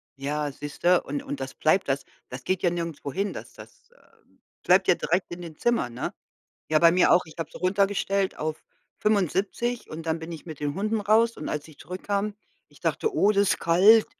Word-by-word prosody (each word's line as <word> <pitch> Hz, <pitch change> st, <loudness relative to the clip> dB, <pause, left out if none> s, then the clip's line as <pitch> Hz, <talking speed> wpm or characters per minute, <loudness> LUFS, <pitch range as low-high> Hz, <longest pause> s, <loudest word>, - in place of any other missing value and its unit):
Ja, 145 Hz, +2 st, -2 dB
siehst 145 Hz, +1 st, -9 dB
du, 175 Hz, 0 st, +5 dB
und 145 Hz, +1 st, -4 dB
und 140 Hz, -, -5 dB
das 135 Hz, 0 st, -5 dB
bleibt, 170 Hz, +5 st, +2 dB
das 135 Hz, +1 st, 0 dB, 0.2 s
das 125 Hz, 0 st, -8 dB
geht 185 Hz, +4 st, -1 dB
ja 175 Hz, -, +4 dB
nirgendwo 170 Hz, -4 st, -4 dB
hin, 200 Hz, +6 st, -2 dB
das -, -, -9 dB
das, -, -, -15 dB
ähm, -, -, -29 dB, 0.2 s
bleibt 185 Hz, +1 st, +4 dB
ja -, -, +7 dB
direkt 175 Hz, +2 st, -1 dB
in 175 Hz, -, -6 dB
den 165 Hz, -3 st, -9 dB
Zimmern, 235 Hz, -, 0 dB
ne? -, -, -3 dB, 0.6 s
Ja, 155 Hz, 0 st, +4 dB
bei 170 Hz, 0 st, +7 dB
mir 180 Hz, +1 st, +4 dB
auch, 180 Hz, -, +5 dB
ich 160 Hz, -, -14 dB
hab 165 Hz, -, -3 dB
so -, -, -11 dB
runtergestellt 195 Hz, +1 st, +1 dB
auf 155 Hz, 0 st, -3 dB, 0.4 s
75 210 Hz, +4 st, 0 dB
und 160 Hz, +1 st, -7 dB
dann 160 Hz, 0 st, -1 dB
bin 160 Hz, +1 st, -7 dB
ich 160 Hz, -, -10 dB
mit 155 Hz, -4 st, -8 dB
den 145 Hz, -1 st, -2 dB
Hunden 215 Hz, +4 st, -1 dB
raus 220 Hz, +3 st, +3 dB
und -, -, -5 dB
als 150 Hz, -1 st, -3 dB
ich 155 Hz, -, -16 dB
zurückkam 200 Hz, +3 st, -3 dB, 0.3 s
ich -, -, -21 dB
dachte: 440 Hz, -2 st, 0 dB
„Oh, 205 Hz, -6 st, +4 dB
das 200 Hz, -1 st, +3 dB
ist -, -, -1 dB
kalt.“ 200 Hz, +7 st, +6 dB
175 Hz, 215 wpm, -26 LUFS, 155-200 Hz, 0.6 s, ja